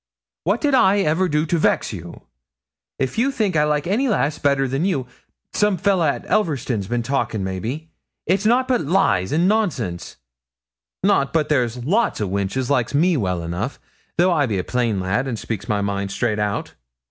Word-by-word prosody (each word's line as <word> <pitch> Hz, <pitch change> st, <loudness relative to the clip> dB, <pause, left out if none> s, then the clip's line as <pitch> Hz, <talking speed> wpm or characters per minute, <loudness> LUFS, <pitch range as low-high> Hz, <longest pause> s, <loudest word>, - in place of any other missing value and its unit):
What -, -, +1 dB
did 290 Hz, -2 st, +1 dB
I 200 Hz, -5 st, +4 dB
ever 180 Hz, +3 st, +1 dB
do 150 Hz, 0 st, +1 dB
to 165 Hz, +1 st, 0 dB
vex -, -, +1 dB
you? 85 Hz, -3 st, -9 dB, 0.7 s
If 130 Hz, -, -2 dB
you 260 Hz, +4 st, +3 dB
think 215 Hz, -9 st, -1 dB
I 150 Hz, -1 st, +4 dB
like 150 Hz, -1 st, 0 dB
any 220 Hz, +10 st, +1 dB
lass 155 Hz, -, 0 dB
better 140 Hz, -1 st, +2 dB
than 135 Hz, +5 st, -1 dB
you 170 Hz, -10 st, 0 dB, 0.5 s
some 210 Hz, -2 st, +2 dB
fellah 185 Hz, -4 st, +2 dB
at -, -, -3 dB
Elverston's 135 Hz, -, 0 dB
bin 120 Hz, +1 st, -1 dB
talkin', 115 Hz, -5 st, -1 dB
maybe 115 Hz, -, -4 dB, 0.3 s
it's 190 Hz, +4 st, +1 dB
nout 245 Hz, +4 st, +3 dB
but 250 Hz, -2 st, +2 dB
lies 145 Hz, -, +1 dB
an' 170 Hz, +4 st, +2 dB
nonsense. 145 Hz, -, -1 dB, 0.9 s
Not 185 Hz, -9 st, +2 dB
but 155 Hz, -2 st, +1 dB
there's 125 Hz, -4 st, 0 dB
lots 210 Hz, -, +1 dB
o' 105 Hz, -, -1 dB
wenches 100 Hz, +7 st, -2 dB
likes 125 Hz, -1 st, +1 dB
me 170 Hz, +4 st, +3 dB
well 90 Hz, -, -1 dB
enough, 90 Hz, +10 st, -4 dB, 0.4 s
though 175 Hz, +2 st, +4 dB
I 145 Hz, -5 st, +2 dB
be 105 Hz, -4 st, -1 dB
a 90 Hz, -, -1 dB
plain 120 Hz, -4 st, 0 dB
lad, 100 Hz, +8 st, -1 dB
and 120 Hz, -4 st, -3 dB
speaks 110 Hz, -2 st, -5 dB
my 105 Hz, -1 st, +1 dB
mind 100 Hz, 0 st, -2 dB
straight 105 Hz, +1 st, -1 dB
out.' 105 Hz, -1 st, -2 dB
140 Hz, 185 wpm, -21 LUFS, -, 0.9 s, I